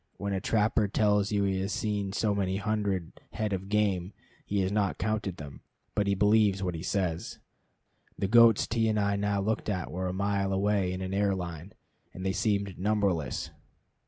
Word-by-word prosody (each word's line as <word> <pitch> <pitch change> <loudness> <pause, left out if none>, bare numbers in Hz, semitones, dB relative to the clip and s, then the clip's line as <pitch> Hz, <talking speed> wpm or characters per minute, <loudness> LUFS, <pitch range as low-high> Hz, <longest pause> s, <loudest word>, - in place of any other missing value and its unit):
When 100 0 -3
a 95 - -1
trapper 105 0 +2
tells 105 0 +2
you 100 -1 +1
he 95 -1 0
has 100 +2 -2
seen 105 -3 -2
so 105 +1 0
many 95 -1 0
hundred 100 -4 -1 0.2
head 105 -2 -2
of 95 +1 -4
game, 100 -3 0 0.3
he 100 -1 -1
has 95 0 0
not 100 -2 0
counted 105 -4 -2
them, 70 -2 -9 0.3
but 100 - 0
he 100 - +2
believes 105 -1 +3
what 90 -1 -1
he 80 - -5
says. 90 -3 -2 0.8
The 100 - 0
goats 115 0 +6
T 115 0 0
and 105 -1 +1
I 100 0 +1
now 100 0 0
looked 110 +2 -1
at 90 -3 -2
were 95 +1 -3
a - - -1
mile 100 +1 0
away 95 -1 +1
in 90 0 -4
an 95 0 -4
air 100 -1 +2
line, 85 0 -6 0.4
and 95 - -6
they 95 - +1
seemed 100 -2 -1
numberless. 95 -7 0
100 Hz, 190 wpm, -29 LUFS, 95-105 Hz, 0.8 s, goats